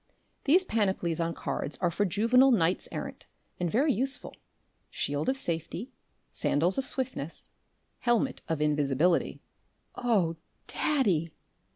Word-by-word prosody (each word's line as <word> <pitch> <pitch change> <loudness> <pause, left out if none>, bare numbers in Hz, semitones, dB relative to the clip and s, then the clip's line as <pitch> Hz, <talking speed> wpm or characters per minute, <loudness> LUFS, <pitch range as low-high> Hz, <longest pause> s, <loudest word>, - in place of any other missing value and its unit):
These 360 +7 +5
panoplies 190 - 0
on 165 0 -1
cards 140 0 -3
are 175 -2 +1
for 205 +5 +1
juvenile 230 +8 +4
knights 185 -7 +2
errant - - -6 0.3
and 175 -1 0
very 275 - +3
useful 265 +5 -2 0.5
shield 145 +2 -1
of 265 - 0
safety, 170 - -4 0.4
sandals 170 - +2
of 265 - -3
swiftness, 255 - -4 0.5
helmet 240 +2 +1
of 160 -2 -1
invisibility." 150 +3 +1 0.5
"Oh, 195 -9 +1 0.3
daddy!" 195 - +1
185 Hz, 115 wpm, -29 LUFS, 165-250 Hz, 0.5 s, These